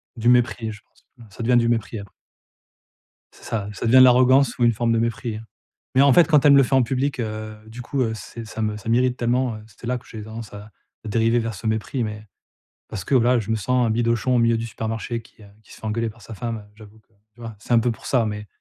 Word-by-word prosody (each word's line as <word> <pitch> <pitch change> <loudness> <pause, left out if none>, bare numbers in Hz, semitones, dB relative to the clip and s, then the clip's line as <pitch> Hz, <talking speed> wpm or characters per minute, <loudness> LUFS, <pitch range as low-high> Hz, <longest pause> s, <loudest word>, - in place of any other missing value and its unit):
du 120 0 +1
mépris, 120 -2 +2
heu, - - -4
je 110 -1 -12
pense, - - -32
ouais, 120 - -14
ça 115 - -7
devient 120 +1 +3
du 115 -1 +2
mépris, 115 -1 -1
apr 100 -2 -11 1.2
C'est - - -17
ça, 105 -3 -3
ça 105 - -3
devient 125 +3 +6
de 130 - +10
l'arrogance 130 +1 +5
ou - - +2
une 120 0 +4
forme 115 +1 0
de 115 - +2
mépris, 115 0 -2
hein. 110 - -9 0.5
Mais, 130 - +4
en 140 0 +6
fait, 170 +6 +6
quand 150 -4 +4
elle 145 - +8
me 140 - +7
le 135 - +6
fait 135 - 0
en 130 - +5
public, 130 +2 -1
heu, 110 -1 -5
du 120 +3 -9
coup, 135 +3 -2
heu, 115 -3 0
c'est 110 +2 -9
ça 110 +1 -6
me 105 -1 -1
ça 105 +1 -7
m'irrite 125 +2 +2
tellement, 120 0 0
heu, 110 - -11
c'est 115 +2 -12
là 125 +1 0
que 120 - -15
j'ai 110 -1 -8
tendance 110 +1 -8
à 105 +1 -10 0.4
à - - -5
dériver 115 +2 +2
vers 115 -1 -3
ce 110 +3 -6
mépris, 110 +4 -1
mais 105 0 -6 0.6
parce 95 -4 -6
que, 140 - 0
voilà, 125 0 +4
je 110 -1 -4
me 110 - +1
sens 125 +4 +1
un - - 0
bidochon 115 +2 +1
au - - +3
milieu 115 0 +3
du 115 - -4
supermarché, 115 +1 -4
qui, 115 -1 -21
heu, - - -14 0.2
qui - - -18
se - - -12
fait - - -15
engueuler 115 +2 -1
par 115 +1 -18
sa 110 - -9
femme. 115 +2 -4
Heu, 105 -1 -16
j'avoue 110 0 -15
que, 110 - -32 0.2
tu - - -31
vois, 115 -1 -7
c'est 115 - -5
un - - +6
peu 120 +1 +1
pour - - -13
ça, 125 -4 +2
mais 105 0 -5
115 Hz, 285 wpm, -22 LUFS, 110-125 Hz, 1.2 s, de